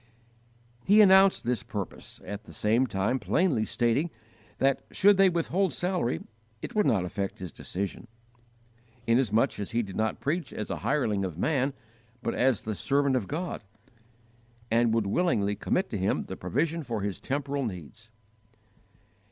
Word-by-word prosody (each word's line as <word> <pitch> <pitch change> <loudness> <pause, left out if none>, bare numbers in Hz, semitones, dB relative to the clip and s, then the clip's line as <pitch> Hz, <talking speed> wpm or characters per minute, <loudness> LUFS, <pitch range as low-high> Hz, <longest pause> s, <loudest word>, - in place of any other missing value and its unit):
He 205 +3 +5
announced 195 -1 +6
this 125 0 0
purpose, 100 -3 -7
at 105 +2 -6
the - - -13
same 115 +5 +2
time 100 +5 0
plainly 120 - +1
stating 120 +10 +1 0.5
that, 135 0 +2
should 205 0 +4
they 195 -1 +6
withhold 175 +2 0
salary, 175 - -1 0.4
it - - -7
would 210 -1 +2
not 95 -5 +2
affect 95 +2 -4
his 90 -3 -7
decision, 100 +8 -5 1.0
inasmuch 115 -3 +2
as 100 - -4
he 120 0 +1
did 95 -3 -8
not 110 0 -1
preach 160 +4 -2
as 105 - -5
a - - -2
hireling 115 -9 0
of 90 -4 -4
man, 135 - +1 0.5
but 115 - -1
as 130 -2 +2
the 110 - -3
servant 140 +5 +1
of 115 -7 -1
God, 170 -1 -4 1.1
and 115 0 +3
would 115 -2 +1
willingly 105 - +1
commit 185 - -1
to 105 - -2
Him 95 - 0
the 95 - -7
provision 155 - -1
for 115 -7 -4
his 100 -1 -3
temporal 140 0 -2
needs. 110 - -7
120 Hz, 155 wpm, -28 LUFS, 100-155 Hz, 1.1 s, announced